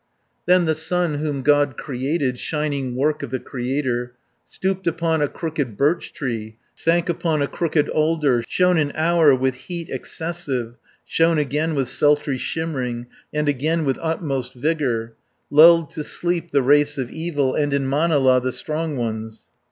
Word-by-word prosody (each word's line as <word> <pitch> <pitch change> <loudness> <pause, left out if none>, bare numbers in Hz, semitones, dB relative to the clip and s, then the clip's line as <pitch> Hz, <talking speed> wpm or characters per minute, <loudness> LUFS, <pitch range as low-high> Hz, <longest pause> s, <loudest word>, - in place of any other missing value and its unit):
Then 180 -1 +5
the 160 - +2
sun 160 -1 0
whom 145 -3 -2
God 145 -2 +3
created, 135 -1 -2
Shining 145 -5 -2
work 150 +4 0
of - - -5
the 130 +1 -2
Creator, 125 -1 -3 0.3
Stooped 190 -1 -3
upon 165 -1 0
a 145 - +2
crooked 145 - -4
birch 155 +5 +1
tree, 115 -5 -5 0.2
Sank 170 +1 +1
upon 160 -3 0
a - - 0
crooked 160 -2 0
alder, 155 -6 +1
Shone 180 -2 +3
an 145 -2 0
hour 160 -3 +4
with 130 0 0
heat 165 +6 -7
excessive, 145 -8 -3 0.3
Shone 165 0 +2
again 150 +2 0
with 135 -3 0
sultry 145 +1 +1
shimmering, 130 -8 -3 0.3
And 150 0 -1
again 155 +4 0
with 135 -2 0
utmost 140 -6 -2
vigour, 125 -5 -1 0.4
Lulled 165 +1 +7
to 160 -2 -5
sleep 175 +1 -2
the 140 -3 +2
race 145 +2 +3
of 130 -3 -3
evil, 160 -5 -1
230 150 - 0
And 145 -1 -1
in 135 -1 0
Manala 140 -3 +3
the 130 +1 -1
strong 155 +1 -3
ones. 110 -2 -4
145 Hz, 160 wpm, -22 LUFS, 130-165 Hz, 0.4 s, Lulled